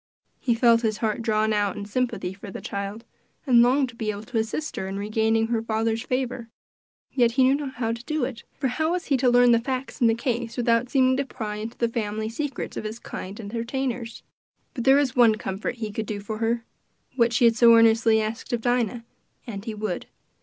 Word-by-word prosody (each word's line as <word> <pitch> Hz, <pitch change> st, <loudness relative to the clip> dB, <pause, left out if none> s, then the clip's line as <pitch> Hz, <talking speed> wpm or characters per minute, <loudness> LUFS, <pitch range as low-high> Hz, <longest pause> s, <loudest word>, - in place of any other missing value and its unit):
He 240 Hz, -3 st, +1 dB
felt 230 Hz, -1 st, +4 dB
his 220 Hz, -2 st, 0 dB
heart 220 Hz, 0 st, -1 dB
drawn 220 Hz, -1 st, +1 dB
out 205 Hz, -2 st, 0 dB
in 205 Hz, -, -5 dB
sympathy 205 Hz, -4 st, -2 dB
for 200 Hz, +2 st, -10 dB
the -, -, -7 dB
child, 200 Hz, +3 st, -5 dB, 0.4 s
and 245 Hz, -4 st, +6 dB
longed 260 Hz, +2 st, +3 dB
to 240 Hz, -, -13 dB
be 220 Hz, -2 st, -3 dB
able 205 Hz, 0 st, -4 dB
to 225 Hz, +1 st, -2 dB
assist 230 Hz, +8 st, -3 dB
her 190 Hz, -, -3 dB
in 195 Hz, +1 st, -4 dB
regaining 220 Hz, +2 st, +1 dB
her 230 Hz, -2 st, 0 dB
father's 225 Hz, 0 st, -1 dB
favor, 250 Hz, -2 st, -3 dB, 0.6 s
yet 240 Hz, -3 st, +2 dB
he 265 Hz, +1 st, +4 dB
knew 260 Hz, +1 st, +5 dB
not 280 Hz, -2 st, -3 dB
how 230 Hz, -1 st, -1 dB
to 230 Hz, +1 st, -5 dB
do 305 Hz, -3 st, -1 dB
it, 240 Hz, -3 st, -6 dB, 0.2 s
for 270 Hz, -, +1 dB
how 315 Hz, +6 st, 0 dB
was 360 Hz, -, -2 dB
he 275 Hz, -, +2 dB
to 250 Hz, 0 st, +3 dB
learn 245 Hz, 0 st, +5 dB
the 230 Hz, -, +5 dB
facts 260 Hz, +3 st, -4 dB
in 235 Hz, -, +6 dB
the 225 Hz, -, +3 dB
case 235 Hz, -1 st, -3 dB
without 235 Hz, 0 st, +2 dB
seeming 260 Hz, -1 st, +3 dB
to 280 Hz, -, +1 dB
pry 210 Hz, -5 st, -5 dB
into 220 Hz, +2 st, -6 dB
the 235 Hz, -, +1 dB
family 220 Hz, -1 st, -3 dB
secrets 275 Hz, +2 st, -4 dB
of -, -, -4 dB
his 215 Hz, +1 st, -5 dB
kind 195 Hz, -3 st, -8 dB
entertainers? 235 Hz, +2 st, -4 dB, 0.5 s
But 245 Hz, -5 st, -4 dB
there 270 Hz, 0 st, +7 dB
was 275 Hz, -3 st, +2 dB
one 235 Hz, -3 st, +6 dB
comfort 195 Hz, +2 st, -4 dB
he 220 Hz, -3 st, -5 dB
could 220 Hz, +1 st, -4 dB
do 210 Hz, -1 st, -3 dB
for 215 Hz, +2 st, -6 dB
her 230 Hz, 0 st, 0 dB, 0.5 s
what 235 Hz, -2 st, +3 dB
she 235 Hz, +1 st, +3 dB
had 230 Hz, -1 st, +5 dB
so 230 Hz, +1 st, +7 dB
earnestly 225 Hz, 0 st, +5 dB
asked 220 Hz, +4 st, -4 dB
of 235 Hz, -, 0 dB
Dinah 240 Hz, -1 st, 0 dB, 0.4 s
and 200 Hz, -4 st, -6 dB
he 225 Hz, -, -4 dB
would. 210 Hz, -4 st, -4 dB
230 Hz, 225 wpm, -25 LUFS, 220-250 Hz, 0.6 s, there